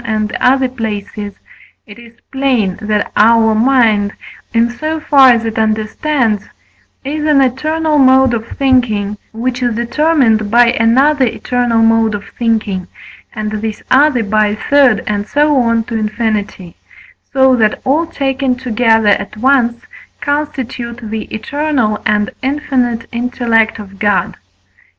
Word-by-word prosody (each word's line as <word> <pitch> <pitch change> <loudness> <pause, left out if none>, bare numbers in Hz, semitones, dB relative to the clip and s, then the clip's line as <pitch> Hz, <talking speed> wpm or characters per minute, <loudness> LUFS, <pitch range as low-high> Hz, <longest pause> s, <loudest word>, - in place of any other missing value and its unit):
and 215 -2 -2
other 260 +1 +3
places, 210 -4 -5 0.5
it 205 +1 -13
is 235 0 -16
plain 255 -9 0
that 210 -1 -2
our 225 +1 +4
mind, 220 -4 +2 0.4
in 230 0 +2
so 310 +6 -4
far 275 -3 +5
as 230 -2 +2
it 225 0 -3
understands, 220 +1 -1 0.6
is 300 +2 -3
an 295 -2 +4
eternal 300 +4 0
mode 260 -1 +4
of 230 -1 -3
thinking, 240 -7 +1 0.2
which 250 +3 -3
is 240 -2 0
determined 235 -3 +1
by 240 +2 +5
another 260 +5 +3
eternal 240 -1 0
mode 225 -1 +2
of 200 - -7
thinking, 215 -6 -2 0.5
and 215 -2 -4
this 215 0 -5
other 265 -2 +3
by 215 0 +1
a 205 - -2
third, 270 0 +2
and 205 0 -3
so 295 +1 +2
on 230 -2 +1
to 230 - -6
infinity; 215 -4 -3 0.6
so 265 -1 +4
that 220 -3 +1
all 310 +5 +1
taken 270 -4 -1
together 225 -3 +1
at 200 +1 -1
once 240 -1 +1 0.4
constitute 265 -5 -4
the 220 -1 -4
eternal 245 -2 -2
and 210 0 0
infinite 260 -4 -1
intellect 235 -2 0
of 195 -2 -11
God. 205 -3 0
235 Hz, 135 wpm, -14 LUFS, 215-265 Hz, 0.6 s, far